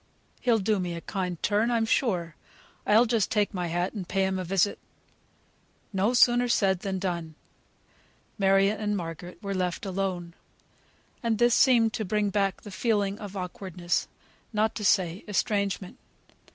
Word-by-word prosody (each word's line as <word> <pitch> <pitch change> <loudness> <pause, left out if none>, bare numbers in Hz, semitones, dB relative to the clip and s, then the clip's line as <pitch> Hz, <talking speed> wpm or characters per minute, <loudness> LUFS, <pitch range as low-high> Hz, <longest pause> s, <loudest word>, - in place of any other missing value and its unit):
He'll 235 -2 +3
do 210 0 +1
me 175 -2 -3
a 170 - -6
kind 180 -3 -3
turn, 215 +3 +2
I'm 230 -2 +2
sure. 180 - 0 0.5
I'll 220 +4 +6
just 225 -3 +1
take 210 -3 +1
my 180 -2 -2
hat, 175 +2 -1
and 195 -5 -6
pay 195 0 +1
him 190 0 -1
a - - -2
visit." 195 +2 +1 1.1
No 200 +6 +1
sooner 245 0 +5
said, 195 -6 +2
than 190 0 -3
done. 170 -4 -3 1.0
Margaret 195 +1 +3
and 210 -1 -1
Mary 170 0 -7
were 200 0 -2
left 180 0 -2
alone. 185 -3 -3 0.9
And 230 -2 0
this 240 +1 +4
seemed 235 -4 +4
to 220 - -2
bring 210 +1 0
back 195 -1 0
the 205 - -9
feeling 205 -1 0
of 205 -2 -7
awkwardness, 180 -1 -3 0.4
not 220 0 +1
to 215 - -5
say 185 -2 +2
estrangement. 200 -2 -1
195 Hz, 155 wpm, -27 LUFS, 180-215 Hz, 1.1 s, I'll